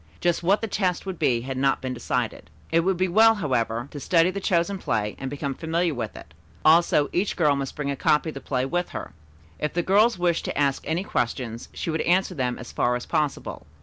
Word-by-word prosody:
Just 175 -1 +1
what 190 +4 +2
the 225 - -2
test 185 -4 -1
would 190 -2 -5
be 120 -2 +2
had 130 +1 -5
not 135 0 +2
been 130 -1 -4
decided. 115 -9 -3 0.2
It 165 - +4
would 185 +2 +1
be 185 +1 +2
well, 225 +5 +6
however, 120 - -1
to 145 - -7
study 170 +4 +3
the 200 - -4
chosen 185 +1 0
play 105 -7 -1
and 135 - -4
become 140 0 -3
familiar 165 +2 -1
with 115 -4 -4
it; 75 - -12 0.3
also 155 -2 +5
each 190 +4 0
girl 150 -5 +3
must 135 -1 -4
bring 145 -1 -2
a - - -2
copy 150 +3 +2
of - - -13
the 135 - -7
play 130 0 -1
with 175 +6 -1
her. - - -7 0.5
If 150 - -2
the 175 - 0
girls 210 +4 +4
wished 175 -1 0
to - - -3
ask 140 -2 +1
any 165 +4 0
questions, 120 - -3
she 165 - -4
would 160 - -1
answer 185 +2 +2
them 125 -6 -1
as 125 - -9
far 125 0 +1
as 125 - -4
possible. 150 - -2
155 Hz, 230 wpm, -25 LUFS, 130-180 Hz, 0.5 s, well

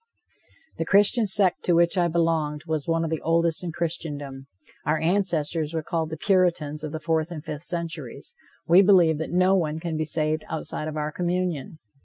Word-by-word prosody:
The 165 - 0
Christian 205 +5 +3
sect 195 -2 +2
to 175 - +3
which 170 +2 +3
I 175 -2 +2
belonged 160 -3 0
was 155 -3 -3
one 165 0 +1
of 165 - -3
the 160 - -2
oldest 165 +1 +1
in 175 - -3
Christendom. 145 -5 -5 0.4
Our 155 +1 +1
ancestors 165 -2 0
were 160 - -2
called 160 0 -2
the 160 - -5
Puritans 170 -5 +1
of 155 - -4
the 160 - -4
fourth 160 0 0
and 160 -3 -8
fifth 150 +2 -6
centuries. 170 - -5 0.3
We 175 +3 +7
believe 175 -6 +5
that 160 - -3
no 185 +2 +3
one 160 -4 -1
can 165 -1 -3
be 155 - -1
saved 155 +1 -1
outside 155 -1 -4
of 155 0 -5
our 150 0 -2
communion. 175 -4 -2
165 Hz, 190 wpm, -25 LUFS, 155-175 Hz, 0.4 s, We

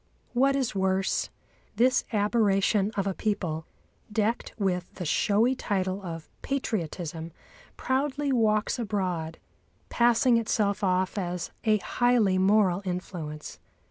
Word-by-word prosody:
What 270 +3 +3
is 265 -3 0
worse, 190 -1 0 0.5
this 250 +2 +3
aberration 205 -2 +2
of 195 - +1
a 195 - 0
people, 180 -7 -2 0.4
decked 220 +2 0
with 185 -4 -1
the 180 - -5
showy 215 - +2
title 195 -5 -2
of 165 -4 -7
"patriotism," 170 - -3 0.5
proudly 275 +2 0
walks 220 -2 +2
abroad, 180 -7 -2 0.5
passing 240 +1 +4
itself 210 -2 0
off 185 +1 +1
as 180 -2 -3
a 215 -1 +4
highly 220 -4 +2
moral 195 -1 +3
influence. 175 -5 -5
200 Hz, 110 wpm, -27 LUFS, 180-230 Hz, 0.5 s, passing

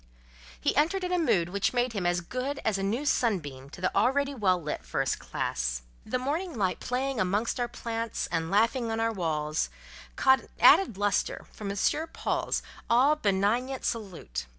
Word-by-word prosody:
He - - +1
entered 365 +5 +2
in 360 - -2
a 360 - +2
mood 175 - +2
which 200 +4 0
made 245 -1 +1
him 190 -5 -1
as 175 0 +1
good 255 +10 -3
as 210 -3 +1
a - - -2
new 225 +9 -1
sunbeam 145 - 0
to 175 - -11
the 185 - 0
already 275 +7 +2
well 190 -8 +2
lit 150 - -4
first - - -1
classe. - - -2 0.2
The - - 0
morning 300 +4 -2
light 185 -3 0
playing 260 0 -2
amongst 205 +6 0
our 240 - +1
plants 230 -1 -3
and 165 0 -1
laughing 230 +4 +2
on 225 0 -1
our 225 0 +1
walls, 155 -4 -1 0.5
caught 265 0 +5
an - - -15
added 335 - +6
lustre 205 -2 0
from 205 -2 -6
M. 200 - -3 0.4
Paul's - - -1 0.3
all 260 +6 +5
benignant 230 +3 0
salute. 170 - -4
220 Hz, 175 wpm, -28 LUFS, 180-255 Hz, 0.5 s, added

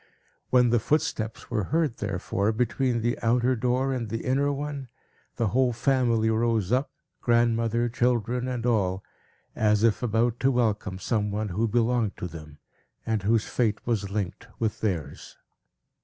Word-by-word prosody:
When 125 -2 +4
the 120 - +4
footsteps 110 -4 -1
were 105 -5 0
heard, 155 - 0
therefore, 100 +1 -1
between 125 +1 0
the 120 +1 -1
outer 120 +2 +2
door 125 +3 0
and 120 -4 -3
the 115 +1 -4
inner 140 +3 +2
one, 145 -1 -4 0.5
the 115 -3 0
whole 125 +1 +2
family 115 -3 +2
rose 110 -3 +1
up, 130 +3 +1 0.3
grandmother, 115 0 +2
children, 125 0 0
and 125 -2 -3
all, 95 -5 +1 0.5
as 105 -1 +2
if 115 -2 +3
about 120 0 +1
to 135 - +3
welcome 110 -6 0
some 105 +1 -1
one 105 +1 -2
who 105 +6 0
belonged 115 -1 +1
to - - -5
them, 75 -3 -11 0.5
and 110 -2 0
whose 110 +2 +2
fate 110 -4 -1
was 105 -5 -1
linked 100 -3 -4
with 110 -1 -2
theirs. 90 -9 -3
115 Hz, 155 wpm, -26 LUFS, 105-125 Hz, 0.5 s, When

